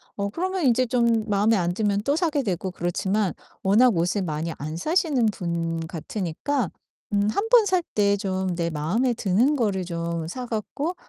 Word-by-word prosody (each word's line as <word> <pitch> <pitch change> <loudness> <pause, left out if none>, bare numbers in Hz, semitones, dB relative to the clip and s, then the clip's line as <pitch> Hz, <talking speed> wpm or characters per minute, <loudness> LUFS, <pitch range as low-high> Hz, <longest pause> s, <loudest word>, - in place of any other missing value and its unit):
어 200 0 -2
그러면 370 - -2
인제 255 0 +4
좀 235 -2 +1
마음에 205 +2 +3
안 175 -1 0
들면 205 0 0
또 280 +5 +1
사게 320 -4 +1
되고 190 -3 -2
그렇지만 190 +2 -1 0.3
워낙 220 +4 +5
옷을 180 +4 +1
많이 160 0 -3
안 155 +2 -4
사시는 300 - +1
분 170 -4 -2
같으니까 180 - -2 0.4
음 205 0 +2
1 405 - -1
번 470 -2 +6
살 370 -2 +2
때 200 -1 +3
좀 190 -2 -2
내 170 -1 -1
마음에 180 - 0
드는 225 +7 +2
거를 205 -8 0
좀 170 -1 -3
사 250 +9 -5
갖고 245 - -3
205 Hz, 290 characters per minute, -24 LUFS, 175-255 Hz, 0.4 s, 번